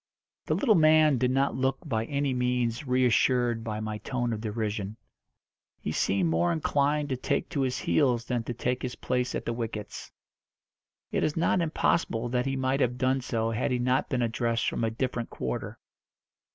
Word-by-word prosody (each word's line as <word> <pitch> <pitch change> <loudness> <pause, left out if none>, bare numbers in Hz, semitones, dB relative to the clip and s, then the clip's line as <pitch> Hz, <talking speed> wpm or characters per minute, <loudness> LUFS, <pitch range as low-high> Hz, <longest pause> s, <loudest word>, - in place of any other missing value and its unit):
The - - +2
little 255 -7 +3
man 155 - +5
did 125 0 +2
not 135 +2 +1
look 130 +1 0
by 115 -6 -1
any 140 +1 -1
means 125 0 0
reassured 125 -2 +2
by 110 -2 -3
my 110 0 -4
tone 120 -1 -2
of 110 - -4
derision. 105 -1 -3 0.8
He - - -3
seemed 95 -3 +1
more 85 +2 +2
inclined 145 - +1
to 130 - 0
take 125 - -1
to 140 - -1
his 130 -1 0
heels 125 -5 +1
than 120 -1 -1
to 120 - -3
take 125 +2 -1
his 125 - -4
place 125 0 -1
at - - -4
the 120 - -1
wickets. 110 -3 -5 1.0
It - - 0
is 150 - 0
not 170 +2 +2
impossible 155 -7 0
that 125 +2 0
he 135 - -1
might 130 +1 0
have 125 -2 +1
done 130 +1 +1
so 115 -2 -1
had 115 +2 0
he 125 - +1
not 125 +2 +1
been 125 -4 0
addressed 115 0 0
from - - -1
a 115 - +2
different 120 0 -3
quarter. 65 -1 -4
125 Hz, 185 wpm, -28 LUFS, 115-135 Hz, 1.0 s, man